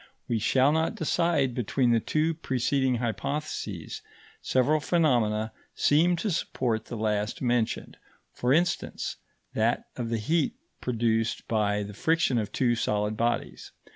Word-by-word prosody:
We 115 -2 0
shall 130 +6 +3
not 160 +1 +1
decide 160 -5 +1
between 125 +1 +1
the 115 - +4
two 155 +7 0
preceding 130 -3 0
hypotheses; 140 - -3 0.4
several 140 +4 +2
phenomena 120 -10 +1 0.2
seem 170 +5 +4
to 200 +4 -2
support 120 -8 -1
the 120 - -6
last 105 0 -1
mentioned 120 -3 -1 0.4
for 125 - 0
instance, 175 +5 0 0.4
that - - +1
of 120 -2 -3
the 115 - 0
heat 165 - 0 0.3
produced 115 -2 0
by 105 -2 +1
the 105 +1 -7
friction 160 - +2
of 105 - -3
two 120 -2 +2
solid 105 -2 0
bodies. 120 +2 -2
125 Hz, 135 wpm, -27 LUFS, 110-155 Hz, 0.4 s, the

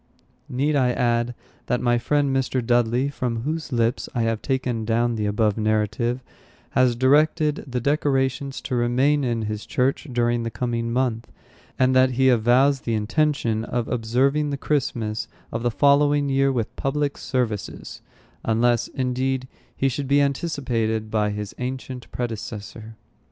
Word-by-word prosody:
Need 140 +4 0
I 125 -3 +3
add, 120 -1 0 0.3
that 125 - +1
my 120 -1 +2
friend, 140 +1 +1
Mr. 130 -2 0
Dudley, 120 +3 +2
from 120 -4 -3
whose 155 +2 -3
lips 115 0 0
I 120 - +1
have 115 -1 -1
taken 130 -4 -1
down 115 +2 +1
the 105 -2 -1
above 105 0 +1
narrative, 110 +3 0 0.5
has 125 -2 +3
directed 150 +4 +3
the 125 -1 -2
decorations 135 0 0
to 125 - -3
remain 130 +5 +2
in 120 -3 -1
his 105 0 -4
church 135 +4 0
during 120 -1 +1
the 115 - -2
coming 115 -1 -2
month, 120 -2 -1 0.5
and 130 0 +3
that 130 0 +4
he 130 +1 +4
avows 125 +4 +4
the 115 - -1
intention 115 0 0
of 120 0 -2
observing 130 +5 +1
the 140 - -2
Christmas 120 -7 -1 0.2
of 115 - -3
the 120 - +1
following 145 +3 +3
year 135 0 +3
with 120 -4 -2
public 145 +1 -1
services, 120 -6 -3 0.4
unless, 115 +1 +2
indeed, 130 0 -1 0.3
he 135 - +2
should 135 +1 -2
be 140 +1 +4
anticipated 125 -7 -1
by 105 -1 +1
his 105 0 -5
ancient 130 0 -5
predecessor. 110 -1 -6
125 Hz, 150 wpm, -23 LUFS, 115-135 Hz, 0.5 s, that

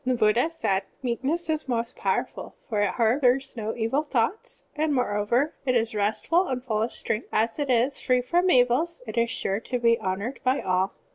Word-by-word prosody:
The 255 -1 +1
Buddha 230 +5 +3
said: 195 -12 -1 0.2
"Meekness 265 +8 -1
is 310 -3 -2
most 235 0 -1
powerful, - - -2
for 215 -5 0
it 205 - +2
harbors 250 +5 +2
no 220 -1 -3
evil 235 +5 0
thoughts, 305 - -2
and, 305 -1 +1
moreover, 240 +4 +1
it 255 -2 +1
is 230 -1 +1
restful 220 - +1
and 255 -1 -3
ftdl 220 -3 0
of 240 - -7
strength. 225 0 -3
As 225 +5 0
it 285 -2 -1
is 250 +3 +2
free 250 -1 +2
from 350 +9 +1
evils, 255 +4 +2
it 215 -1 -7
is 235 0 +2
sure 195 -2 -2
to 250 +2 -3
be 230 -1 +3
honored 200 +8 -3
by 255 +1 +2
all. 185 +1 0
245 Hz, 195 wpm, -26 LUFS, 220-275 Hz, 0.2 s, Buddha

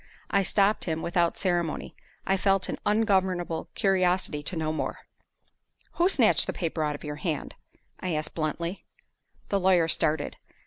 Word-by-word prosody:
I 200 - +4
stopped 200 +2 +2
him 160 -2 -2
without 170 0 +1
ceremony; 175 -4 -1 0.3
I 195 - +2
felt 195 0 +2
an - - -3
ungovernable 190 -6 +1
curiosity 185 -6 +1
to 150 - -2
know 155 -1 -1
more. - - -3 0.9
"Who 350 +2 +2
snatched - - +4
the - - -2
paper 165 -2 -2
out 150 -1 -1
of - - -10
your 150 -1 -5
hand?" 155 -1 -3 0.5
I 180 -3 -2
asked, 155 0 -3
bluntly. 170 +3 -3 0.7
The 200 - +1
lawyer 180 -3 +4
started. 155 -2 +1
175 Hz, 150 wpm, -27 LUFS, 160-195 Hz, 0.9 s, I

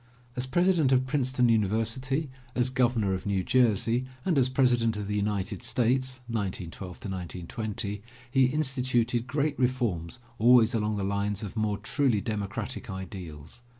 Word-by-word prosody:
As 125 0 -3
President 175 -2 +3
of 130 0 +4
Princeton 130 -3 +1
University, 115 +6 0 0.2
as 125 0 +1
Governor 120 -6 +2
of 95 +1 -4
New 95 -2 +1
Jersey 120 +2 +2 0.2
and 180 - +2
as 130 -1 +3
President 120 -4 +2
of 105 -1 -4
the 105 - -2
United 100 -1 -1
States, 130 +1 0
(1912 95 -4 -4
1920) 100 +3 -4 0.3
he 135 -1 +5
instituted 125 -4 +1
great 145 +2 -1
reforms 120 -7 -1 0.2
always 120 +1 +6
along 105 -2 0
the 100 - -2
lines 100 +1 -1
of 100 -1 -6
more 110 -2 0
truly 115 +2 +1
democratic 100 -2 -4
ideals. 90 -2 -8
115 Hz, 140 wpm, -28 LUFS, 100-130 Hz, 0.3 s, always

